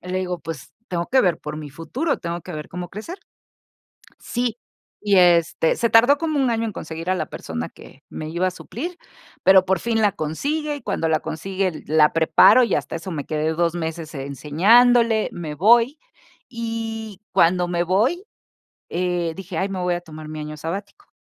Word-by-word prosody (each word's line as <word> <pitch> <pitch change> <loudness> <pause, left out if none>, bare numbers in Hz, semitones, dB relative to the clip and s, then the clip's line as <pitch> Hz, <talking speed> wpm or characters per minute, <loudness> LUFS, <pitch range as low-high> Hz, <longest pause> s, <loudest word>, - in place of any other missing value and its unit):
Le 180 +1 -3
digo: 180 -1 -3
"Pues, 165 -4 -8
tengo 170 -1 -3
que 260 0 +5
ver 180 -4 +2
por 150 0 -6
mi 150 -2 -7
futuro, 235 - -2
tengo 170 0 -4
que 180 - -9
ver 150 -1 -6
cómo 180 0 -6
crecer". 330 - -8 1.0
Sí 240 -2 -2 0.4
y 205 -2 +2
este, 170 -2 +4
se 235 -1 0
tardó 245 +6 +6
como 310 -3 -1
un 260 -2 +2
año 230 0 0
en 220 - -3
conseguir 165 +1 -7
a 185 - +3
la 185 - -2
persona 80 0 -5
que - - -16
me 155 0 -6
iba 180 +3 0
a - - -3
suplir, 335 - -7 0.5
pero 190 0 +7
por 190 0 +1
fin 225 +2 0
la 205 - +4
consigue 290 - -2
y 285 - -8
cuando 165 - -1
la 155 -1 +2
consigue 185 +2 -3
la 150 0 +4
preparo 165 +9 +6
y 230 - 0
hasta - - -2
eso 170 +2 -6
me 145 -3 -4
quedé 155 0 -1
2 170 +1 0
meses 165 -1 -4
e 135 0 -5
enseñándole. 220 - +4
Me 155 -3 -6
voy. 235 - +4 0.5
Y 225 -3 -5
cuando 175 +1 +3
me 175 0 0
voy, 230 - +1 0.7
eh, 175 -2 -1
dije: 185 -3 -8
"Ay, 195 +3 -1
me 190 - -4
voy 180 0 0
a 175 - -4
tomar 155 -2 -10
mi 155 0 -6
año 150 0 -7
sabático". 200 - -6
180 Hz, 190 wpm, -22 LUFS, 160-225 Hz, 1.0 s, pero